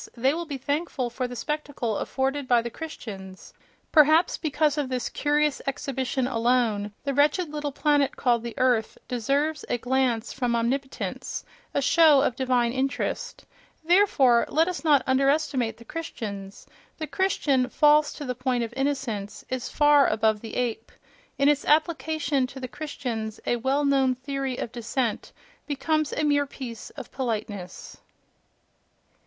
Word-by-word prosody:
they 260 +4 +2
will 335 +1 -4
be 285 -3 -4
thankful 285 -2 -2
for 250 +1 -2
the 245 - -8
spectacle 285 -6 -3
afforded 270 +1 -2
by 245 -1 +5
the 235 0 -4
Christians: 195 -12 -9 0.4
perhaps 310 +2 +5
because 300 -2 +1
of 280 -3 -2
this 255 -1 -2
curious 295 -1 +1
exhibition 265 -1 -2
alone 230 -4 +1
the 280 0 -1
wretched 295 +5 +2
little 295 -1 -3
planet 290 -1 +2
called 240 -2 +2
the 235 +1 -7
earth 250 -4 +1
deserves 280 +5 0
a - - +1
glance 245 -2 0
from 245 -3 0
omnipotence, 265 +4 -3 0.3
a 280 - +1
show 300 -1 +6
of 250 - 0
divine 250 -2 +1
interest.... 270 +1 -2 0.4
Therefore, 315 -9 +4
let 320 +3 +3
us 360 -2 -4
not 295 -4 +4
underestimate 270 -2 +1
the 235 - -15
Christians: 200 -11 -6 0.3
the 315 - -3
Christian, 290 -8 +1
false 300 0 +4
to 290 - -7
the 250 - -2
point 250 -1 -1
of 230 0 -5
innocence, 265 -7 -3
is 255 -1 -3
far 295 -2 +5
above 220 -1 +1
the 225 - -7
ape—in 250 +3 -3
its 290 -1 +3
application 310 -3 +1
to 260 +1 -10
the 255 - -5
Christians 245 -7 -5
a 240 - +1
well 270 +4 +1
known 270 -2 +3
theory 270 0 -3
of 225 - -4
descent 235 0 -2 0.4
becomes 305 +1 0
a 305 - -1
mere 285 -1 +2
piece 245 -5 -8
of - - -10
politeness.... 210 -7 -5
265 Hz, 150 wpm, -26 LUFS, 240-295 Hz, 0.4 s, show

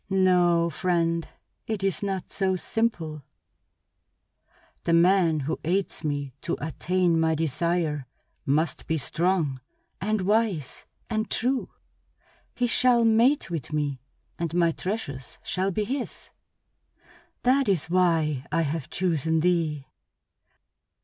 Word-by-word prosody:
No, 175 -3 +3
friend, 170 -1 0 0.4
it 215 -3 -3
is 195 -5 0
not 195 -2 -3
so 190 -1 +1
simple. 175 -7 -1 1.6
The 170 - +2
man 170 -2 +4
who 150 +4 -2
aids 185 +4 -1
me 145 -3 -2
to - - -2
attain 170 +2 +1
my 160 0 +2
desire 160 -2 -1 0.4
must 145 +1 0
be 160 - +1
strong 155 -2 0 0.4
and 215 +1 0
wise 200 - 0 0.2
and 220 -1 -2
true. 255 +2 0 0.9
He 245 - +1
shall 240 0 +4
mate 230 +1 +3
with 160 -5 -4
me, 145 -4 -1 0.4
and 170 -1 -2
my 170 -1 +4
treasures 160 - -5
shall 190 +1 -1
be 205 +3 -1
his. 255 +4 -5 1.1
That 260 -1 +3
is 170 -5 +1
why 165 -6 +1
I 165 - +2
have 150 -1 -3
chosen 160 -3 0
thee." 160 -5 +1
170 Hz, 115 wpm, -26 LUFS, 155-195 Hz, 1.6 s, man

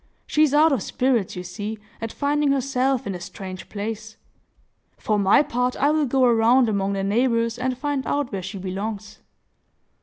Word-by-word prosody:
She 305 - +1
is 305 -3 +5
out 305 +2 +5
of 265 -7 +1
spirits, 245 -5 0
you 180 - -5
see, 205 +5 -5 0.2
at 225 0 -4
finding 290 0 +1
herself 270 -1 0
in 200 - -3
a 180 - -6
strange 185 +1 -8
place. 220 +1 -6 0.8
For 215 -1 0
my 200 +9 +5
part, 250 -3 -1
I 285 +2 +3
will 305 -2 +1
go 265 +1 +2
around 240 +1 +4
among 200 -2 0
the 195 0 -2
neighbors, 230 +2 +1
and 255 0 -1
find 285 0 -2
out 285 -3 -1
where 195 -2 -3
she 195 +3 -6
belongs." 200 +3 -5
230 Hz, 180 wpm, -23 LUFS, 200-270 Hz, 0.8 s, is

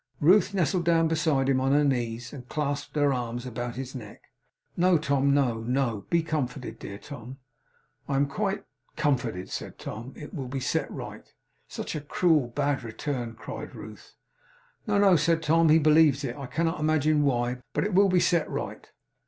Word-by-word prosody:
Ruth 180 +6 +5
nestled 175 0 +1
down 165 -1 +3
beside 155 -4 +1
him 130 -1 +2
on 135 +1 +2
her 145 +1 +4
knees, 120 -3 -1
and 125 -3 -10
clasped 145 -1 -3
her 145 -2 +3
arms 120 -1 -3
about 120 0 -4
his 130 0 -6
neck. 110 -6 -9 0.5
'No, 180 0 +4
Tom! 140 -2 +1
No, 130 -5 +2
no! 120 -3 -1
Be 170 -1 +2
comforted! 130 -7 -3
Dear 100 - -7
Tom!' 130 +1 -9 0.7
'I 140 - 0
am 140 +1 +3
quite 195 +7 -2 0.3
comforted,' 125 - -1
said - - -6
Tom. 120 +5 -7
'It 150 - -9
will 135 -7 -4
be 135 +2 -3
set 125 - -1
right.' - - -8 0.4
'Such - - -5
a 150 - -3
cruel, 150 -2 +2
bad 140 +3 -1
return!' 120 0 -4
cried - - -8
Ruth. - - -11 0.7
'No, 205 -1 +2
no,' 200 -2 +6
said 165 +2 +1
Tom. 165 +1 +4
'He 155 - +7
believes 155 -2 +4
it. - - -3
I 140 -3 -7
cannot 165 +4 -1
imagine 155 -1 +2
why. 125 -3 0
But - - +1
it 205 0 -2
will 195 +2 +5
be 180 -1 +4
set 170 -3 +2
right. - - -5
140 Hz, 180 wpm, -27 LUFS, 125-160 Hz, 0.7 s, He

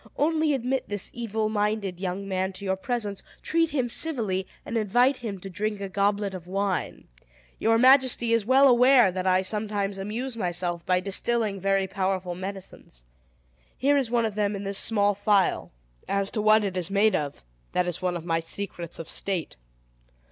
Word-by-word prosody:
"Only 310 -1 +2
admit 260 +1 -2
this 205 -2 -1
evil 220 -2 -2
minded 210 -3 -1
young 190 +1 -4
man 190 0 -1
to 200 +2 -8
your 190 0 +1
presence, 205 -1 -3 0.2
treat 330 0 +1
him 260 -5 0
civilly, 225 -9 -1 0.2
and - - -5
invite 245 +5 +3
him 215 -6 -6
to 195 - -7
drink 210 +2 -3
a 200 - -4
goblet 200 +1 0
of 180 -2 -8
wine. 195 0 -2 0.5
Your 225 +1 +3
majesty 255 -2 +4
is 230 -2 +2
well 265 +5 +5
aware 250 -4 +6
that 185 +1 -3
I 185 0 +3
sometimes 205 -1 -2
amuse 230 +6 -4
myself 175 -4 -2
by 180 0 +2
distilling 205 +1 -1
very 195 0 +2
powerful 190 -1 -2
medicines. 185 - -8 0.7
Here 285 +2 +3
is 270 -5 +1
one 235 -1 +2
of 220 - -2
them 205 0 0
in 200 - -5
this 195 0 -1
small 205 -2 +2
phial. 200 -1 +1 0.4
As 200 0 -1
to 215 - -2
what 215 0 +5
it 195 -2 -2
is 180 -1 -1
made 200 +1 +3
of, 145 - -3 0.3
that 180 0 +1
is 175 -1 -3
one 180 -1 -1
of 165 - -9
my 165 -1 +1
secrets 170 0 -5
of 165 - -7
state. 185 - -2
200 Hz, 180 wpm, -26 LUFS, 190-230 Hz, 0.7 s, aware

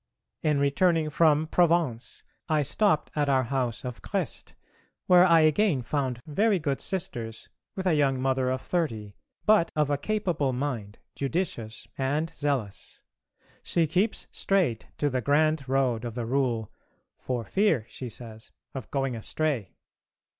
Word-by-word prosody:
In 150 -2 +2
returning 155 +3 +2
from 155 0 +4
Provence 165 -8 +1 0.3
I 155 -2 +3
stopped 190 +2 +1
at 145 -2 +1
our 130 -1 +3
house 125 -1 -2
of 125 -2 -6
Crest, - - -4 0.5
where 180 -1 +7
I 170 -3 +6
again 155 - +3
found 130 -2 -2
very 200 +7 +2
good 145 -5 -2
Sisters 120 - -4 0.3
with 190 - -4
a 180 - +3
young 140 -3 +2
Mother 130 -1 +1
of 130 0 -1
thirty, 115 - -2 0.3
but 210 -6 +4
of 150 -1 +1
a 145 - 0
capable 175 -9 0
mind, 125 -6 -3 0.2
judicious 135 -7 -3
and 145 +5 -1
zealous. 135 -9 -3 0.6
She 170 -2 +1
keeps 185 +8 0
straight 175 - 0
to 145 - +1
the 130 -2 -1
grand 145 +1 +2
road 130 -4 +1
of 120 -2 -5
the 120 -2 -3
Rule, 120 -4 0 0.5
"for 125 -2 -3
fear," 165 - +2
she 125 +1 -7
says, 110 -1 -10 0.2
"of 130 -4 -7
going 135 -3 -1
astray." 125 - -2
140 Hz, 145 wpm, -27 LUFS, 125-165 Hz, 0.6 s, where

